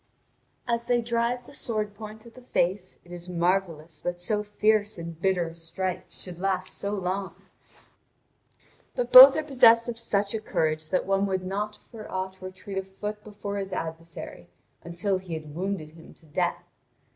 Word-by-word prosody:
As 235 0 0
they 245 -1 +3
drive 235 +1 -1
the - - -12
sword 215 -6 -2
point 215 +1 -10
at 235 - -13
the 255 - -13
face, 185 -5 -1
it 175 - -16
is 175 0 -8
marvellous 170 -3 -1
that 175 0 -3
so 210 +4 0
fierce 210 0 +1
and 170 -1 -7
bitter 180 -3 +1
a - - -11
strife 175 +2 -4
should 175 -2 -9
last 190 -1 -1
so 200 - -3
long. 190 0 -3 1.6
But 245 -1 -1
both 265 +2 +12
are 310 - 0
possessed 235 -5 +6
of 230 -1 -2
such 205 -3 0
courage 155 -4 -1
that 185 - +1
one 195 +1 +2
would 190 -1 -1
not 205 +3 -2
for 220 -3 -11
aught 190 0 -4
retreat 185 +1 -5
a - - -4
foot 210 +2 -6
before 205 -1 -6
his 195 -1 -5
adversary 165 -1 -6 0.3
until 185 +3 -1
he 180 -3 -6
had 155 -2 -8
wounded 175 -2 -3
him 165 0 -15
to 165 - -22
death. 150 - -1
195 Hz, 170 wpm, -27 LUFS, 175-215 Hz, 1.6 s, both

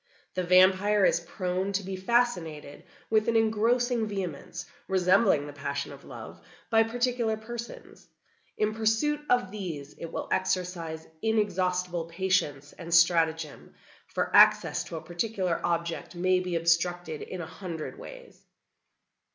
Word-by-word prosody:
The 185 - -1
vampire 190 +3 +5
is 170 - +3
prone 185 +2 -3
to 195 +1 0
be 190 +1 -4
fascinated 185 -9 -1 0.3
with 215 -1 +3
an 230 - +1
engrossing 225 +2 +2
vehemence, 185 -8 -5 0.2
resembling 185 -3 +3
the 145 - -8
passion 140 0 -4
of - - -13
love, - - -10 0.3
by 225 0 +6
particular 235 -1 0
persons. 235 +2 -9 0.5
In 215 0 +1
pursuit 225 +7 +1
of 245 -7 +2
these 165 -9 -6
it 165 - -6
will - - -4
exercise 175 -4 -2 0.2
inexhaustible 180 -5 0
patience 165 -5 -1
and 170 -1 -9
stratagem, 165 -2 +2 0.3
for - - -2
access - - +6
to - - -7
a 160 - -6
particular 175 +1 -2
object 170 +1 -2
may 185 +1 +2
be 180 -1 -3
obstructed 170 -1 0
in 185 - -6
a 170 - -4
hundred 165 -3 -7
ways. - - -12
185 Hz, 135 wpm, -28 LUFS, 170-220 Hz, 0.5 s, by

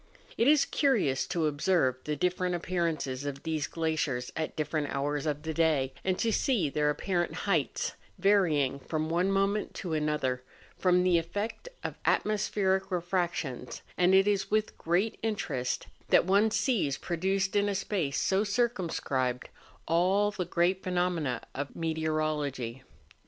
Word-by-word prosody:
It 230 - +2
is 300 -1 +5
curious 215 - +1
to 170 -3 0
observe 150 -3 +2
the 150 - -1
different 180 +3 0
appearances 165 -7 -2
of 140 -1 -5
these 160 -2 -1
glaciers 155 -7 -2
at 160 - -3
different 150 -1 -1
hours 145 +2 -1
of 150 0 -2
the 160 0 -3
day; 150 -5 +2
and 185 -1 0
to 230 - +1
see 215 - +1
their 150 0 +1
apparent 175 +3 -1
heights, 165 - 0 0.2
varying 160 -9 +3
from 155 +3 -3
one 175 +4 +1
moment 195 +2 0
to 175 -4 -4
another, 150 -5 0 0.3
from 180 -1 +3
the 180 -2 +4
effect 205 - -4
of - - -5
atmospheric 200 -2 +1
refractions; 175 -8 -2
and 180 +1 +4
it 195 +1 +5
is 200 -2 +1
with 215 0 0
great 180 +7 0
interest 170 - -2 0.2
that - - +5
one 200 +4 +4
sees 210 - +1
produced 190 +4 -1
in 205 0 +3
a 200 - -1
space 185 -7 -1
so 195 +2 +2
circum¬ 215 -4 0
scribed 125 -2 -1 0.4
all 190 +5 +3
the 185 -3 -3
great 175 +2 +1
phenomena 175 -8 -1
of 140 0 -5
meteorology. 155 -6 -2
170 Hz, 145 wpm, -29 LUFS, 150-195 Hz, 0.4 s, is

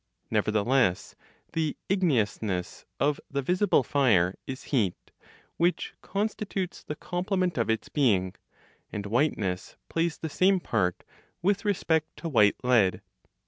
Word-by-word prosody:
Nevertheless, 110 -2 +2 0.4
the 160 -1 -1
igneousness 110 - 0
of 145 +1 +1
the 140 0 -2
visible 180 -1 +3
fire 110 -10 +3
is 130 0 -6
heat, 105 -9 0 0.5
which 175 +2 +1
constitutes 200 -2 -3
the 150 - -5
complement 180 +1 -1
of 115 -2 0
its 110 0 0
being; 100 -11 +2 0.6
and 105 -1 -4
whiteness 100 -6 -1
plays 165 0 0
the 160 - -4
same 185 +5 +3
part 95 - -1 0.4
with 200 +3 +1
respect 160 -6 0
to 170 - -5
white 105 -8 +5
lead. 115 -7 +3
140 Hz, 120 wpm, -28 LUFS, 105-175 Hz, 0.6 s, white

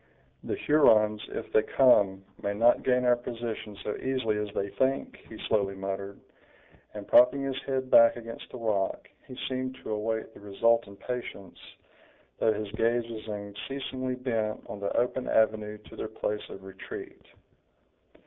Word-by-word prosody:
"The - - -2
Hurons, 110 -8 +4
if - - -6
they 110 - +6
come, 100 -6 +4 0.2
may 100 0 -1
not 115 +3 +4
gain 125 -1 +2
our 125 0 +5
position 115 -3 -6
so 105 - -2
easily 130 -5 -1
as 105 -1 -3
they 100 - -1
think," 135 +5 -1
he 110 - -9
slowly 100 -3 +1
muttered; 100 +1 -5 0.8
and 105 -1 -7
propping 125 +3 +6
his 135 -1 -3
head 130 -1 -2
back 115 0 +8
against 115 -1 -8
the - - -7
rock, 105 -5 -1 0.2
he 130 - -10
seemed 130 0 -3
to - - -5
await 110 +1 -2
the - - -14
result 110 +3 +2
in 100 - -12
patience, 120 -7 -6 0.8
though 110 - +4
his 105 -1 -4
gaze 115 +2 +1
was 110 -1 -7
unceasingly 130 +5 -4
bent 115 -4 -2
on 100 - -7
the 100 0 -2
open 125 +1 0
avenue 110 -1 +2
to 105 - -15
their - - -4
place 105 0 -4
of 95 - -10
retreat. 95 0 -9
110 Hz, 160 wpm, -28 LUFS, 105-125 Hz, 0.8 s, back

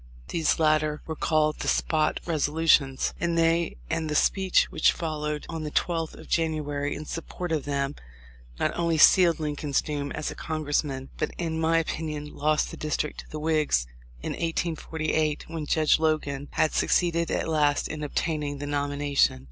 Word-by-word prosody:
These 165 -2 +1
latter 155 -1 +2
were 160 - -4
called 155 -1 +1
the - - -3
"Spot 155 -1 +1
Resolutions," 155 -3 +2
and 170 0 0
they 165 - +2
and 160 - -2
the 150 - -1
speech 190 +4 +3
which - - +4
followed 150 -2 -3
on 165 -2 -5
the 150 - -3
12th 165 +1 -1
of - - -12
January 150 -3 -1
in 155 - -7
support 165 +2 -5
of 155 -3 0
them 140 -1 -1 0.7
not - - 0
only 170 -2 +1
sealed 170 +2 +6
Lincoln's 150 -2 -1
doom 145 -2 -3
as 150 - -3
a - - -8
Congressman, 145 -3 -2
but - - 0
in 160 -2 -2
my 165 +1 +3
opinion, 155 -2 -3
lost 155 +1 +1
the - - -8
district 150 0 -2
to - - -10
the 155 - -6
Whigs 150 - +1 0.4
in - - -2
1848, 160 -2 -1
when 160 -2 -5
Judge 155 0 +3
Logan 145 -3 0
had 155 - +2
succeeded 170 -2 +2
at - - -1
last 150 -2 +2
in 155 0 -6
obtain 150 +1 -1
ing 145 -1 -3
the 145 - -5
nomination. 145 - +1
155 Hz, 170 wpm, -26 LUFS, 145-165 Hz, 0.7 s, sealed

